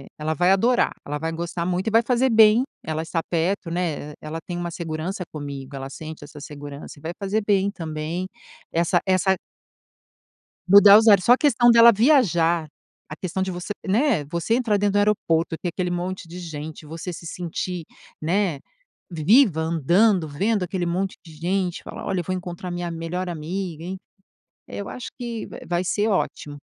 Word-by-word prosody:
é - - -14
ela 155 +1 -1
vai 180 +4 +3
adorar, 240 +6 +3
ela 145 +1 -4
vai 160 +1 -2
gostar 170 +1 -3
muito 185 +3 -1
e - - 0
vai 225 +2 +5
fazer 250 +2 +2
bem, 220 +1 +6 0.2
ela 160 0 -2
está 165 0 -2
perto 170 +1 -1
né, 160 -4 -3
ela 155 +1 -6
tem 175 - -4
uma 175 0 -3
segurança 170 +3 -4
comigo, 140 -2 -7
ela 135 0 -6
sente 155 +1 -8
essa 145 0 -12
segurança 145 0 -9
e - - -18
vai 165 +2 -4
fazer 200 +2 0
bem 200 -1 +2
também, 165 0 -4 0.5
essa 170 +1 +2
essa 190 0 +3 1.3
Mudar 200 +1 +9
os 220 +1 +3
ares. 200 -4 +6
Só 245 - +8
a - - +3
questão 240 -5 +4
dela 235 0 +8
viajar, 175 - +3 0.4
a 155 - -6
questão 185 +2 -4
de 190 0 -1
você 175 +2 -7 0.2
né, 220 - +2
você 170 +9 -1
entrar 225 -5 +1
dentro 205 0 +1
do - - +2
aeroporto 175 -5 +1
e - - -10
ter 175 - -3
aquele 180 +1 -2
monte 175 0 -4
de 175 +2 -9
gente, 155 -2 -7
você 165 +4 -6
se 170 - -9
sentir, 175 0 -4 0.4
né, 175 -2 0 0.5
vi 160 -3 -6 0.2
viva, 160 -5 -3
andando, 170 +3 +2
vendo 200 +8 0
aquele 180 -1 -2
monte 185 +3 -2
de 160 - -12
gente 180 +3 -2
falar: - - -8
"Olha 190 - -1
eu - - -8
vou 185 +3 -2
encontrar 180 0 -6
minha 175 -1 -3
melhor 165 +3 -4
amiga", 170 0 -4
enfim, 185 +2 -5 0.7
eu 200 - -6
acho 250 - -6
que, 235 -2 -5
va - - -10
vai 175 +1 0
ser 210 +4 0
ótimo. 150 -7 -2
175 Hz, 190 wpm, -23 LUFS, 160-200 Hz, 1.3 s, Mudar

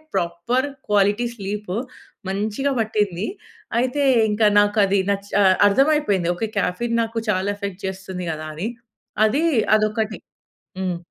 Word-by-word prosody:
Proper 175 +11 0 0.2
quality 205 +3 +3
sleep 205 -2 -5 0.6
మంచిగా 215 +8 -1
పట్టింది. 210 -4 0 0.5
అయితే 255 +3 0 0.3
ఇంక 210 +2 -2 0.2
నాకు 205 +1 +2
అది 195 0 +2
నచ్ 200 0 -3 0.4
అర్థం 270 +8 +4
అయిపోయింది. 200 - 0
ఓకే 220 +5 -2
కెఫెయిన్ 230 +6 0
నాకు 225 0 -5
చాలా 185 -1 +1
ఎఫెక్ట్ 200 -2 -6
చేస్తుంది 190 -1 -6
కదా 155 0 -5
అని. 185 +8 -3 0.6
అది 275 +9 +1 0.3
అదొక్కటి. 215 0 0 0.6
హ్మ్. 185 -2 -1
205 Hz, 125 wpm, -22 LUFS, 190-225 Hz, 0.6 s, అర్థం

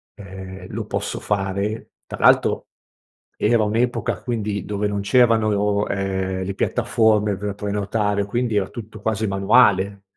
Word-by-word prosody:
ehm, 95 -2 -9
lo 110 0 -4
posso 100 0 -3
fare 100 +2 -2
tra - - -8
l'altro - - +3 0.7
era 110 +1 +3
un'epoca 115 +4 -1
quindi 105 -4 -3
dove 105 0 -1
non 100 -1 -2
c'erano, 105 -3 +2
ehm, 95 -1 -2
le 100 - -3
piattaforme 110 -2 +2
per 105 -1 -4
prenotare 105 0 -1
quindi 120 +2 -1
era 95 - 0
tutto 110 -2 -9
quasi 110 0 -1
manuale. 100 -1 +3
105 Hz, 130 wpm, -22 LUFS, 100-110 Hz, 0.7 s, l'altro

